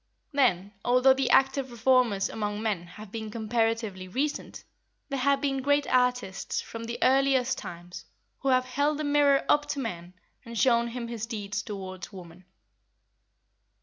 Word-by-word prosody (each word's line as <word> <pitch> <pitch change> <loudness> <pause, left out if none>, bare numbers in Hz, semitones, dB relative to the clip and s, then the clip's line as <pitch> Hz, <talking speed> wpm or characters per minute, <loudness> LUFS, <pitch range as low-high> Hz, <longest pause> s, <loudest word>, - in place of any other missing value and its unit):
Then, 205 - +1
although 255 +2 +5
the 265 -1 0
active 270 +1 +3
reformers 235 -4 +2
among 210 -1 -3
men 195 -6 -2
have 210 +3 -12
been 220 -1 -5
comparatively 225 -3 -1
recent, 275 +10 -3 0.5
there 275 -1 -2
have 275 +1 +2
been 270 -2 0
great 285 +1 +2
artists, 250 -6 0
from 230 0 -7
the 235 +1 -4
earliest 260 -1 +3
times, 175 +1 -9 0.3
who 275 - -1
have 255 -1 +3
held 285 +3 0
the 305 - -3
mirror 285 -1 +3
up 295 0 +3
to 285 - -3
man 180 -7 -5 0.3
and 235 0 -8
shown 235 +1 +3
him 235 0 -5
his 230 -1 -5
deeds 210 -2 -4
towards 190 -3 -7
woman. 180 -2 -12
235 Hz, 150 wpm, -28 LUFS, 205-270 Hz, 0.5 s, although